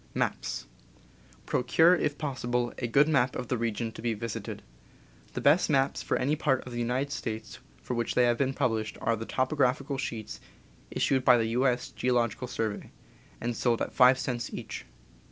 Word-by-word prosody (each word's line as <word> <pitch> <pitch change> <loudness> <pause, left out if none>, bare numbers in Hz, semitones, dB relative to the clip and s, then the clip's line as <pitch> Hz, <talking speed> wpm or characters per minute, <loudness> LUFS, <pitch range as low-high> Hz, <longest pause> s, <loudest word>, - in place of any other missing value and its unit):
Procure, 160 +7 +4
if 150 -5 0
possible, 125 -4 -2
a 120 - -1
good 140 +6 +4
map 130 -5 +2
of 125 - -5
the 125 - +1
region 115 0 -2
to - - -10
be 115 -1 -1
visited. 115 +1 -5 0.7
The - - -3
best 150 +6 +4
maps 135 -2 +2
for - - 0
any 140 +4 +1
part 135 -4 +1
of 125 - -8
the 120 - -3
United 125 +4 0
^ - - -11
States 110 -5 -5 0.2
for - - -3
which 120 -1 -1
they 125 - +5
have 120 -1 +2
been 135 -1 +1
pub - - +2
lished 110 -1 -3
are 115 - +1
the 115 +1 -7
topographical 135 +1 0
sheets 110 - -5 0.5
issued 130 -1 +1
by 125 -1 +7
the 115 - +1
U. 125 +4 +2
S. 125 0 -1
Geological 125 -1 0
Survey, 110 -4 -3 0.5
and 120 0 -2
sold 120 0 +1
at - - -3
five 125 0 +6
cents 125 -3 -3
each. - - -6
125 Hz, 185 wpm, -29 LUFS, 115-135 Hz, 0.7 s, by